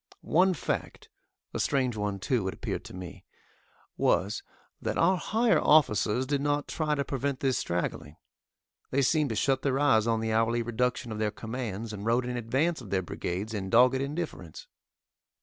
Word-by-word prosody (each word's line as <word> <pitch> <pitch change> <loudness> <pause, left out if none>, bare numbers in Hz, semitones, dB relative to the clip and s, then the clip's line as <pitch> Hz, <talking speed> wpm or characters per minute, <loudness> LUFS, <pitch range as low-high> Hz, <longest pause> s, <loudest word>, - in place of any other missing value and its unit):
One 185 +3 +3
fact - - -4 0.4
a - - -3
strange 130 -4 +1
one, 105 -2 -2
too, 105 0 0
it 95 - -3
appeared - - -4
to - - -9
me 90 -1 -9 0.7
was, 100 +5 +1 0.4
that - - -2
our 190 - +4
higher 225 +5 +2
officers 130 -5 +3
did 140 +1 0
not 145 0 0
try 155 -2 -1
to 140 -1 -1
prevent 135 0 -2
this 135 -2 +1
straggling. 80 -3 -3 0.7
They 140 +1 +1
seemed 150 +1 +2
to 110 - -2
shut 135 +3 +1
their 135 -1 +1
eyes 115 -6 +3
on 115 -1 +2
the 110 0 -1
hourly 115 +1 +2
reduction 120 0 -1
of 110 - -4
their 110 -1 +1
commands, 110 -1 -5
and 100 -1 -6
rode 120 +3 +1
in 125 0 -3
advance 135 +8 0
of 110 - -10
their 95 -1 0
brigades 95 +5 -4
in 95 -3 -3
dogged 125 +4 +5
indifference. 140 - -5
120 Hz, 175 wpm, -28 LUFS, 105-140 Hz, 0.7 s, dogged